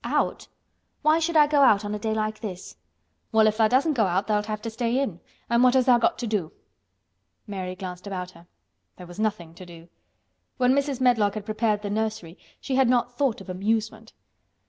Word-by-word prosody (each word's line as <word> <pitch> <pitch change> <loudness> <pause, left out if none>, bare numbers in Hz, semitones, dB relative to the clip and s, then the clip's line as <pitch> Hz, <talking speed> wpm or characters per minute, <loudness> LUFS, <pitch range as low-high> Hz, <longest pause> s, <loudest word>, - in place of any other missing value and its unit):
"Out? - - -1 0.6
Why 310 +2 +4
should 330 0 0
I 300 - +7
go 290 -1 +2
out 210 -6 +5
on 205 - -3
a 210 - -3
day 220 +1 -2
like 215 0 -2
this?" 190 -4 -7 0.6
"Well, 220 -2 +4
if 215 0 +2
tha' 220 -1 +4
doesn't 280 +6 +2
go 230 -6 +2
out 185 +3 0
tha'lt 210 0 0
have 215 -1 -3
to 230 - -4
stay 235 +2 -1
in, 210 -11 -3 0.3
an' 235 0 +2
what 250 0 +5
has 260 -1 +3
tha' 245 -2 +5
got - - +2
to 245 - -4
do?" 205 -8 -2 0.9
Mary 190 -3 -5
glanced 185 0 -8
about 185 -2 -5
her. 170 -1 -18 0.5
There 180 - -10
was 175 +3 -12
nothing 205 -7 -2
to 170 - -12
do. 170 -1 -13 0.7
When 250 0 +3
Mrs. 280 -2 -1
Medlock 225 -5 +3
had 210 -1 -6
prepared 215 -1 -1
the 205 - -3
nursery 215 -5 -3 0.2
she 270 - -5
had 265 -2 +4
not 245 -1 +1
thought 255 -6 0
of 195 - -12
amusement. 220 +3 -2
215 Hz, 210 wpm, -25 LUFS, 195-245 Hz, 0.9 s, I